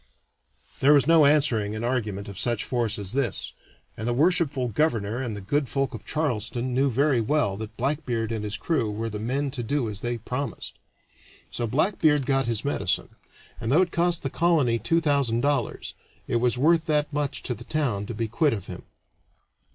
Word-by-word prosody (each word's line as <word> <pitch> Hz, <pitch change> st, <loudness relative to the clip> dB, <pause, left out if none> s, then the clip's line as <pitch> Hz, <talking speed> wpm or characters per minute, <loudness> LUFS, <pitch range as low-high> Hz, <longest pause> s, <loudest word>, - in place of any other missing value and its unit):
There 145 Hz, +2 st, +6 dB
was 140 Hz, -4 st, +5 dB
no 165 Hz, -1 st, +6 dB
answering 125 Hz, -8 st, +2 dB
an 110 Hz, -, -4 dB
argument 110 Hz, -5 st, -2 dB
of 100 Hz, -1 st, -7 dB
such 120 Hz, 0 st, 0 dB
force 120 Hz, -3 st, 0 dB
as 100 Hz, -1 st, -3 dB
this, 130 Hz, -6 st, -1 dB, 0.4 s
and 110 Hz, -, -4 dB
the 120 Hz, -, +1 dB
worshipful 150 Hz, -4 st, +2 dB
governor 115 Hz, -3 st, 0 dB
and 115 Hz, -5 st, -4 dB
the -, -, -7 dB
good 135 Hz, +7 st, -1 dB
folk 135 Hz, +3 st, -1 dB
of -, -, -8 dB
Charleston 125 Hz, -4 st, -1 dB
knew 135 Hz, +2 st, +2 dB
very 135 Hz, 0 st, +2 dB
well 115 Hz, -4 st, +1 dB
that 110 Hz, 0 st, -8 dB
Blackbeard 125 Hz, -4 st, -1 dB
and 110 Hz, -2 st, -3 dB
his 105 Hz, 0 st, -2 dB
crew 145 Hz, -10 st, 0 dB
were 110 Hz, +2 st, -4 dB
the 105 Hz, -, -4 dB
men 135 Hz, +5 st, -1 dB
to 130 Hz, -2 st, -4 dB
do 125 Hz, +1 st, -1 dB
as 105 Hz, -2 st, -4 dB
they 120 Hz, +2 st, -2 dB
promised. 125 Hz, +5 st, -5 dB, 0.8 s
So 120 Hz, -, -2 dB
Blackbeard 150 Hz, -, +2 dB
got 135 Hz, -1 st, +1 dB
his 115 Hz, 0 st, -2 dB
medicine, 145 Hz, -, 0 dB, 0.5 s
and 115 Hz, 0 st, -2 dB
though 165 Hz, +7 st, +5 dB
it 175 Hz, -, -4 dB
cost 170 Hz, 0 st, +1 dB
the 135 Hz, -, -2 dB
colony 155 Hz, -9 st, +2 dB
two 165 Hz, +10 st, +1 dB
thousand 140 Hz, -7 st, +1 dB
dollars, 145 Hz, +1 st, -1 dB, 0.3 s
it 120 Hz, -, +1 dB
was 120 Hz, +1 st, +1 dB
worth 160 Hz, +4 st, +3 dB
that 150 Hz, -1 st, 0 dB
much 145 Hz, -2 st, -2 dB
to 125 Hz, -, -2 dB
the 115 Hz, -, -10 dB
town 120 Hz, -10 st, -1 dB
to 120 Hz, -, -5 dB
be 115 Hz, +1 st, -2 dB
quit 140 Hz, +6 st, +1 dB
of 100 Hz, -4 st, -5 dB
him. -, -, -9 dB
125 Hz, 195 wpm, -25 LUFS, 115-145 Hz, 0.8 s, There